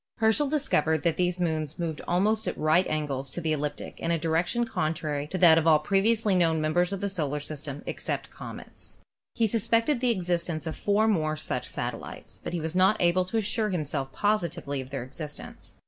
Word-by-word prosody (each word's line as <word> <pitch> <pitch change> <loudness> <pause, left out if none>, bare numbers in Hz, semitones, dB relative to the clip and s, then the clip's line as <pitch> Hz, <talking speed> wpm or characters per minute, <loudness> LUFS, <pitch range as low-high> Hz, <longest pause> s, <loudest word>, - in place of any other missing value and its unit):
Herschel 230 +6 +3
discovered 160 - +1
that 170 -2 +1
these 180 0 +1
moons 160 -3 -1
moved 165 -3 -3
almost 215 +5 +2
at - - -2
right 155 +4 +3
angles 140 -3 -2
to 155 - -5
the 160 -2 0
ecliptic 145 -1 -4
in 165 - -2
a 170 - +2
direction 165 +9 0
contrary 155 -7 -2
to 185 - -3
that 165 -3 +7
of 165 - -1
all 155 -1 +7
previously 205 +6 +2
known 165 -3 +3
mem 155 0 0
t>e»s 175 +2 +2
of 195 - -3
the 200 - 0
solar 150 -7 -2
kingdom 145 -1 -7
except - - -3
the - - -22
comets. - - -10 0.4
He 230 - +2
sus 220 0 -1
pected 230 +4 +2
the 250 0 +1
existence 175 -6 -1
of 160 - -3
four 210 +2 +2
more 155 -7 +1
such - - -3
satellites, - - -6
but - - -5
he 175 - -1
was 160 0 -2
not 190 +3 +4
able 180 +1 +3
to 205 +5 -2
assure 215 0 +1
himself 150 -6 -2
positively 170 -9 -1
of 130 - -10
their 135 -3 -4
exist 150 +3 -7
ence. - - -11
170 Hz, 210 wpm, -27 LUFS, 155-200 Hz, 0.4 s, that